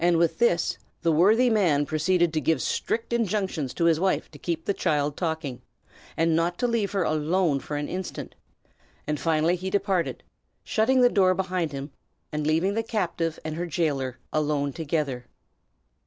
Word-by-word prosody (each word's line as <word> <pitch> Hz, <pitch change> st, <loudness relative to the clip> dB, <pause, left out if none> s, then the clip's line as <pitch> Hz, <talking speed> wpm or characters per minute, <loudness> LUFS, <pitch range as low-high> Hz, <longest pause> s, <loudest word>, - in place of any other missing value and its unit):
With 170 Hz, +1 st, +3 dB
this, 175 Hz, -8 st, +2 dB, 0.2 s
the 165 Hz, -, +3 dB
worthy 210 Hz, +10 st, +5 dB
man 170 Hz, -10 st, +3 dB
proceeded 170 Hz, +3 st, +1 dB
to 155 Hz, -, 0 dB
give 160 Hz, +1 st, +2 dB
strict 230 Hz, +1 st, -2 dB
injunctions 195 Hz, -, -1 dB
to 170 Hz, -, +1 dB
his 165 Hz, -2 st, +4 dB
wife 190 Hz, +1 st, 0 dB
to -, -, -13 dB
keep 165 Hz, -2 st, -3 dB
the 200 Hz, -, +1 dB
child 150 Hz, -5 st, 0 dB
talking, 160 Hz, -7 st, -3 dB, 0.6 s
and 165 Hz, 0 st, +2 dB
not 170 Hz, +2 st, 0 dB
to 245 Hz, -, +1 dB
leave 230 Hz, -4 st, 0 dB
her 195 Hz, -2 st, +1 dB
alone 155 Hz, 0 st, +1 dB
for 145 Hz, +2 st, -5 dB
an 145 Hz, -, -3 dB
instant; 185 Hz, 0 st, -5 dB, 0.7 s
and 150 Hz, -1 st, -2 dB
finally 165 Hz, +1 st, +2 dB
he 185 Hz, +1 st, -4 dB
departed, 195 Hz, -3 st, 0 dB, 0.4 s
shutting 255 Hz, +4 st, +2 dB
the 245 Hz, -, +7 dB
door 185 Hz, -5 st, +3 dB
behind 180 Hz, -4 st, -1 dB
him, 140 Hz, +1 st, -6 dB, 0.4 s
and 150 Hz, 0 st, -2 dB
leaving 165 Hz, +6 st, +2 dB
the 225 Hz, -, 0 dB
captive 180 Hz, -7 st, -2 dB
and 155 Hz, -, -3 dB
her 175 Hz, +1 st, -2 dB
jailer 140 Hz, -7 st, -1 dB, 0.2 s
alone 145 Hz, -2 st, 0 dB
together. 145 Hz, -6 st, -2 dB
170 Hz, 170 wpm, -26 LUFS, 155-190 Hz, 0.7 s, the